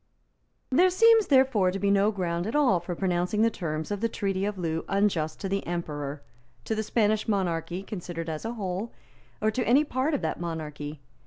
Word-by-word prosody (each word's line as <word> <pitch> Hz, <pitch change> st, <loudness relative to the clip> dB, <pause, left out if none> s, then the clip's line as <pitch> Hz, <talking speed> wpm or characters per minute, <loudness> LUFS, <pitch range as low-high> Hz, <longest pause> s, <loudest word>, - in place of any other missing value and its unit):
There 355 Hz, +8 st, +5 dB
seems, 450 Hz, +3 st, +5 dB
therefore, 260 Hz, -9 st, +4 dB
to 185 Hz, -, -2 dB
be 200 Hz, +1 st, +1 dB
no 200 Hz, +1 st, +4 dB
ground 175 Hz, -2 st, -2 dB
at 225 Hz, -, -3 dB
all 260 Hz, -12 st, +4 dB
for 175 Hz, +1 st, -5 dB
pronouncing 180 Hz, +3 st, 0 dB
the 230 Hz, -, +3 dB
terms 155 Hz, -3 st, -4 dB
of 205 Hz, 0 st, -2 dB
the 230 Hz, -, +1 dB
Treaty 195 Hz, -2 st, -1 dB
of 205 Hz, -1 st, -3 dB
Loo 165 Hz, -2 st, -2 dB
unjust 195 Hz, -6 st, 0 dB
to 195 Hz, -, -2 dB
the 195 Hz, +1 st, -1 dB
Emperor, 150 Hz, -4 st, -4 dB, 0.4 s
to -, -, -1 dB
the 220 Hz, -, -1 dB
Spanish 215 Hz, 0 st, +1 dB
monarchy 180 Hz, -3 st, -1 dB
considered 175 Hz, -4 st, -6 dB
as 155 Hz, -1 st, -4 dB
a 225 Hz, +1 st, -3 dB
whole, 200 Hz, 0 st, -4 dB, 0.5 s
or 215 Hz, -, +3 dB
to 250 Hz, +3 st, -1 dB
any 270 Hz, +5 st, +5 dB
part 285 Hz, +1 st, 0 dB
of -, -, -2 dB
that -, -, -2 dB
monarchy. 150 Hz, -3 st, -5 dB
195 Hz, 195 wpm, -27 LUFS, 170-220 Hz, 0.5 s, There